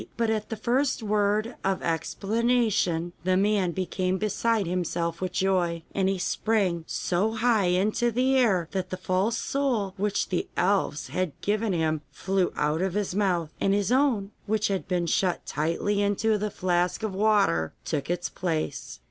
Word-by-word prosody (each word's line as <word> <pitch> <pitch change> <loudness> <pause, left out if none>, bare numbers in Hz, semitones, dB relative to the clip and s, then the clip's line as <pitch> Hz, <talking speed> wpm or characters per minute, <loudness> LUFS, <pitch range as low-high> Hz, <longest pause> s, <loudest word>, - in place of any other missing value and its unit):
But 230 -1 +1
at 215 -1 -2
the 225 - -3
first 250 +3 0
word 210 +2 +1
of 195 -1 0
explanation 195 0 0
the 185 +1 +2
man 200 -2 +2
became 185 +1 -1
beside 215 +1 0
himself 170 -1 -2
with 185 -1 -2
joy, 180 -3 0
and 190 -1 +1
he 195 - 0
sprang 185 -3 0
so 195 +5 0
high 225 -3 +2
into 205 +6 +2
the 255 +3 +2
air 200 -10 +3
that 185 -2 -3
the 185 - -4
false 190 +5 0
soul 245 -10 -1
which 200 +1 0
the 180 - -1
elves 185 -6 +1
had 185 -5 -2
given 210 +1 0
him 160 -3 0
flew 190 +5 0
out 150 +3 0
of 190 0 -1
his 205 -3 -1
mouth, 180 -6 0
and 195 0 +3
his 205 +2 0
own, 250 -7 +2 0.2
which 215 0 +1
had 195 -2 -2
been 180 -2 0
shut 180 +2 0
tightly 170 +7 0
into 205 +2 +2
the 210 0 -1
flask 180 +1 0
of 215 -3 -2
water, 195 - +2
took 150 -2 -2
its 175 0 -1
place. 160 - -3
195 Hz, 165 wpm, -26 LUFS, 175-215 Hz, 0.2 s, air